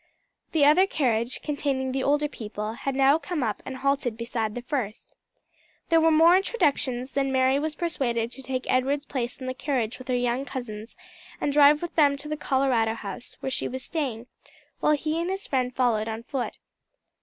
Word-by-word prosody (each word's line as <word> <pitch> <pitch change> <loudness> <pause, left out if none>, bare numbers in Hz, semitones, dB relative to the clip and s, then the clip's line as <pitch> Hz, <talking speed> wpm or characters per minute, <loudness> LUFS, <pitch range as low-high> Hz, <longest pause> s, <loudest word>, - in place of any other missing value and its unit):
The 305 -3 +4
other 360 +7 +6
carriage, 240 - 0
containing 280 -3 -1
the 265 +1 -1
older 290 +2 +2
people, 215 -4 -5
had 270 +3 -3
now 275 +3 +5
come 330 -5 -3
up 215 -3 -2
and 265 - -5
halted 275 -3 0
beside 230 -2 -2
the 245 - -5
first. 245 -5 -4 0.7
There 330 -1 +5
were 325 - +5
more 325 +2 +6
introductions, 275 - 0
then 275 -1 0
Mary 260 +1 +3
was 310 +1 -3
persuaded 245 -9 -1
to 270 - -8
take 260 0 -3
Edward's 275 +3 +1
place 250 -3 -4
in 260 - -6
the 255 - -2
carriage 260 -4 -2
with 255 - -11
her 255 - +1
young 245 +1 0
cousins, 240 -4 -7 0.4
and 285 - 0
drive 295 +2 +6
with 345 - -4
them 285 -3 +4
to 285 +2 -9
the 305 - -2
Colorado 260 -6 +1
House, 240 - -7
where 265 - -3
she - - -2
was 260 0 -5
staying, 260 -8 -3 0.5
while 300 - +3
he 310 +2 -1
and 345 - -2
his 385 +1 -3
friend 255 -2 -1
followed 230 -4 +1
on 225 +1 -4
foot. 260 0 -3
265 Hz, 190 wpm, -26 LUFS, 245-295 Hz, 0.7 s, other